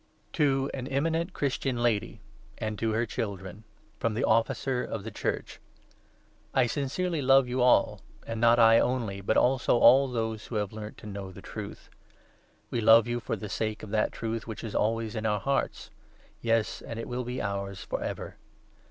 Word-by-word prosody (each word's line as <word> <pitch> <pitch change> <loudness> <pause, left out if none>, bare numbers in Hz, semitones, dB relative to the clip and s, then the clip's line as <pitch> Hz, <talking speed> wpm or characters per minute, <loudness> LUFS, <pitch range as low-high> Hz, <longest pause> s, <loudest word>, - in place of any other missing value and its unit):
FROM - - -38
JOHN. - - -40
II. - - -38
To 135 -2 +2
an 130 -1 -4
eminent 165 +6 0
Christian 135 -2 -1
Lady, 115 -4 0 0.4
I - - -3
AND 110 -1 -3
TO 115 - 0
her 115 +2 +1
Children, 100 -3 -5 0.3
FROM 115 -2 0
the 120 - -1
Officer 125 +3 +1
of 110 -4 -5
the 110 - -6
Church. - - -3 1.0
I 130 - +5
sincerely 145 +7 -1
love 135 -1 +5
you 125 +1 -1
all, 125 0 +4 0.2
and 115 -1 -4
not 120 0 +6
I 115 -1 +7
only, 115 -6 -1
but 100 - +1
also 125 -1 +3
all 135 +3 +7
those 110 -3 -3
who 120 - -6
have 105 -1 -1
learnt 105 0 -7
to - - -13
know 100 -2 -6
the - - -12
Truth. - - -8 0.8
We 120 - 0
love 115 +1 +7
you 120 0 -1
for 115 - -3
the 105 0 -6
sake 110 +2 -3
2 - - -7
of 100 - -11
that 110 0 +1
Truth 115 0 -4
which 110 - -6
is 110 - -5
always 115 +1 0
in 110 0 -1
our 105 -1 +1
hearts; 140 +4 -2 0.5
yes, 115 -1 0
and 115 - -7
it 115 - -5
will 125 +1 -3
be 125 +1 -4
ours 100 -1 -3
for - - -4
ever. - - -5
115 Hz, 200 wpm, -28 LUFS, 110-125 Hz, 1.0 s, I